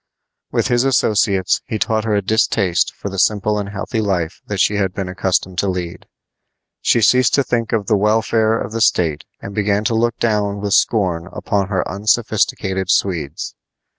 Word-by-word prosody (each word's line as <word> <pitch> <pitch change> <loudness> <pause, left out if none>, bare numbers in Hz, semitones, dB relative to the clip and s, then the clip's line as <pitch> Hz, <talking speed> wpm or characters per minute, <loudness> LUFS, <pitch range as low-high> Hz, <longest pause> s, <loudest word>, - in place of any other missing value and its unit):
With - - 0
his 120 0 +2
associates 105 -7 +2
he 110 - -2
taught 110 +1 0
her 110 -2 +1
a 100 - 0
distaste 95 -3 +1
for - - -7
the 95 -1 -4
simple 105 +1 +1
and 100 -1 -4
healthy 105 +3 -3
life 95 -3 -2
that 100 -2 -3
she 105 +2 +2
had 95 -2 -1
been 95 -2 -3
accustomed 95 0 -1
to 100 - +1
lead. 90 -2 -4 0.7
She 115 - +2
ceased 125 +2 +4
to 140 - +2
think 115 -3 -2
of 110 -3 0
the 105 - +2
welfare 110 +2 +2
of 100 - -5
the 115 0 -3
state 80 -7 +1 0.2
and 100 - -7
began 105 0 0
to 115 +1 0
look 120 +1 0
down 105 -3 0
with 100 -1 -2
scorn 90 -8 +1
upon 100 -2 -1
her 95 -2 -1
unsophisticated 100 -2 0
Swedes. 80 -8 -1
100 Hz, 180 wpm, -18 LUFS, 95-110 Hz, 0.7 s, ceased